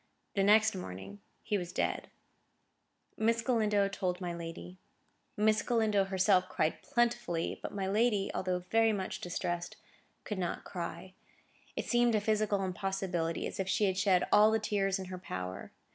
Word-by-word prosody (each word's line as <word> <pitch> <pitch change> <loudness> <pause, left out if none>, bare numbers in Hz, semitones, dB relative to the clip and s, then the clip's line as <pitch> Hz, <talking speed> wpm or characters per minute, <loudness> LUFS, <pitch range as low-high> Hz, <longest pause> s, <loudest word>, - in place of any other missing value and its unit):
The 200 - +1
next 215 +2 +5
morning 95 - -7 0.2
he 210 -2 0
was 175 -1 -6
dead. - - -1 1.1
Miss 230 +1 +2
Galindo 210 -5 +2
told 185 -2 -2
my 175 -2 -3
lady. 165 - -8 0.6
Miss 215 +1 +3
Galindo 220 -5 +2
herself 190 -1 +3
cried 155 - 0
plentifully, 235 -10 0
but - - -5
my 195 -2 -3
lady, 210 0 +2
although 185 -1 -1
very 225 -1 +4
much 190 -2 -4
distressed, 175 0 -3 0.5
could 210 -3 -4
not 175 -2 -2
cry. 185 +1 -6 0.6
It - - -3
seemed 240 -1 +3
a - - +3
physical 210 -1 +1
impossibility, 185 -3 -2
as - - -6
if 190 0 -1
she 205 - +2
had 190 -2 +1
shed 190 -2 +3
all 210 +1 +7
the 220 - +3
tears 200 -2 0
in 190 - -6
her 185 0 -7
power. 90 - -6
195 Hz, 160 wpm, -32 LUFS, 180-215 Hz, 1.1 s, all